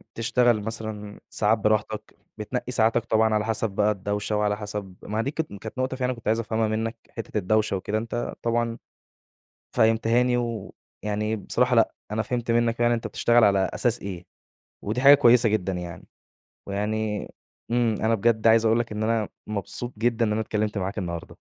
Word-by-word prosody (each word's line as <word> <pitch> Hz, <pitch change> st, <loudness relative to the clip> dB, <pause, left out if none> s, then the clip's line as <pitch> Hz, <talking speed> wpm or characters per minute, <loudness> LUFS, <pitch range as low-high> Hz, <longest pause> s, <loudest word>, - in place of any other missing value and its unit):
تشتغل 120 Hz, -1 st, +2 dB
مثلًا 110 Hz, -1 st, -5 dB
ساعات 110 Hz, +1 st, +2 dB
براحتك، 110 Hz, 0 st, -1 dB, 0.2 s
بتنقي 125 Hz, +4 st, -4 dB
ساعاتك 115 Hz, -1 st, +2 dB
طبعًا 110 Hz, 0 st, +2 dB
على 105 Hz, 0 st, +1 dB
حسب 115 Hz, -1 st, 0 dB
بقى 105 Hz, +2 st, +2 dB
الدوشة 105 Hz, +1 st, -2 dB
وعلى 105 Hz, 0 st, +1 dB
حسب 105 Hz, -3 st, -6 dB
ما 105 Hz, +1 st, -3 dB
هي -, -, +1 dB
دي 140 Hz, -, -2 dB
كانت 160 Hz, -6 st, -4 dB
كانت 110 Hz, +3 st, -8 dB
نقطة 130 Hz, 0 st, -1 dB
فعلًا 125 Hz, -1 st, 0 dB
كنت 115 Hz, -2 st, -11 dB
عايز 110 Hz, +1 st, +2 dB
أفهمها 110 Hz, -1 st, 0 dB
منك، 115 Hz, +2 st, -2 dB
حتّة 115 Hz, -2 st, -6 dB
الدوشة 105 Hz, +1 st, +1 dB
وكده، 100 Hz, +3 st, -2 dB
أنت 115 Hz, +2 st, -3 dB
طبعًا 115 Hz, 0 st, 0 dB, 1.0 s
فهمتها 115 Hz, +2 st, +3 dB
لي. 125 Hz, 0 st, +2 dB
ويعني 110 Hz, -2 st, -4 dB
بصراحة 125 Hz, +4 st, +1 dB
لأ، 115 Hz, -, +3 dB, 0.2 s
أنا 110 Hz, +1 st, 0 dB
فهمت 120 Hz, +1 st, -3 dB
منك 115 Hz, 0 st, +1 dB
يعني 120 Hz, 0 st, +4 dB
أنت 115 Hz, -, -3 dB
بتشتغل 120 Hz, -1 st, +3 dB
على 100 Hz, -1 st, +4 dB, 0.2 s
أساس 120 Hz, -2 st, +1 dB
إيه، 90 Hz, -2 st, -6 dB, 0.6 s
ودي 110 Hz, +5 st, -2 dB
حاجة 140 Hz, +2 st, +9 dB
كويسة 120 Hz, -4 st, +5 dB
جدًا 95 Hz, -3 st, 0 dB
يعني. 90 Hz, -1 st, -6 dB, 0.6 s
ويعني 105 Hz, +1 st, -2 dB, 0.4 s
إمم، 120 Hz, -2 st, +2 dB
أنا 115 Hz, +1 st, +3 dB
بجد 115 Hz, +1 st, +2 dB
عايز 115 Hz, 0 st, +5 dB
أقول 115 Hz, +1 st, +4 dB
لك 115 Hz, -, -3 dB
إن 105 Hz, 0 st, -3 dB
أنا 110 Hz, -1 st, 0 dB, 0.2 s
مبسوط 110 Hz, +4 st, -4 dB
جدًا 115 Hz, +1 st, +1 dB
إن 105 Hz, -, 0 dB
أنا 110 Hz, -, 0 dB
اتكلّمت 105 Hz, -1 st, -2 dB
معاك 100 Hz, +2 st, -3 dB
النهارده. 85 Hz, -3 st, -5 dB
110 Hz, 180 wpm, -25 LUFS, 105-115 Hz, 1.0 s, حاجة